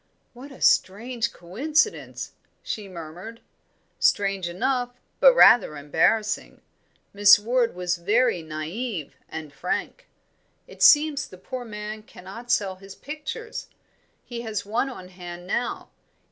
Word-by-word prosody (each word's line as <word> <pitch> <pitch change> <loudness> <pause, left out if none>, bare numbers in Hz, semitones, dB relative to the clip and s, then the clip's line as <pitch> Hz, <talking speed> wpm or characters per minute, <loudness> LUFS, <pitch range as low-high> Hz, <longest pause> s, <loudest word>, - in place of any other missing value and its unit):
"What 260 +4 -11
a 270 - -14
strange 230 +4 +2
coincidence!" 295 - -1 0.3
she 210 -2 -5
murmured. 180 +6 -9 0.6
"Strange 195 -3 +2
enough, 245 +6 -1 0.2
but - - +7
rather 195 - +6
embarrassing. 160 +9 0 0.5
Miss 205 0 +8
Ward 235 +2 0
was 180 0 -1
very 210 +2 +2
naive 160 - -5
and 155 -2 -7
frank. 160 +6 -4 0.6
It - - -15
seems 295 -1 +6
the 185 - -13
poor 250 +6 -7
man 210 0 -6
cannot 215 +4 -11
sell 195 -5 +1
his 195 +1 -12
pictures; 310 - -7 0.6
he 235 -1 -6
has 220 -4 -4
one 230 +6 0
on 185 -8 -10
hand 175 -1 -9
now. 235 +6 -3
210 Hz, 120 wpm, -25 LUFS, 180-245 Hz, 0.6 s, Miss